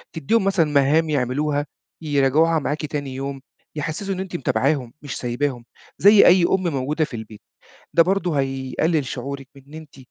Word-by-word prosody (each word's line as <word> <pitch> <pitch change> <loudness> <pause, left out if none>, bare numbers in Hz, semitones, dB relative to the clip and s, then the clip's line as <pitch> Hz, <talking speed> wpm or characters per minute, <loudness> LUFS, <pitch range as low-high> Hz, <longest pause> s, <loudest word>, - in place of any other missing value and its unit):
تدّيهم 180 +8 +1
مثلًا 195 -4 +2
مهام 145 +3 +3
يعملوها 145 +2 0 0.4
يراجعوها 150 +3 +2
معاكِ 150 +1 -3
تاني 145 -3 -5
يوم 135 0 -5 0.3
يحسّسوا 155 +6 -3
إن 185 - -5
أنتِ 190 -2 -5
متابعاهم 130 -2 0
مش 145 - -6
سايباهم 125 0 -3 0.3
زي 205 +1 +7
أي 180 0 +6
أم 185 +2 +1
موجودة 150 +1 -1
في 130 - -9
البيت. 110 -1 -9 0.5
ده 170 - +7
برضه 180 -3 0
هيقلِّل 135 +4 -1
شعورِك 135 +1 -6
بإن 140 +2 -16
أنتِ 155 -3 -11
145 Hz, 155 wpm, -22 LUFS, 135-165 Hz, 0.5 s, زي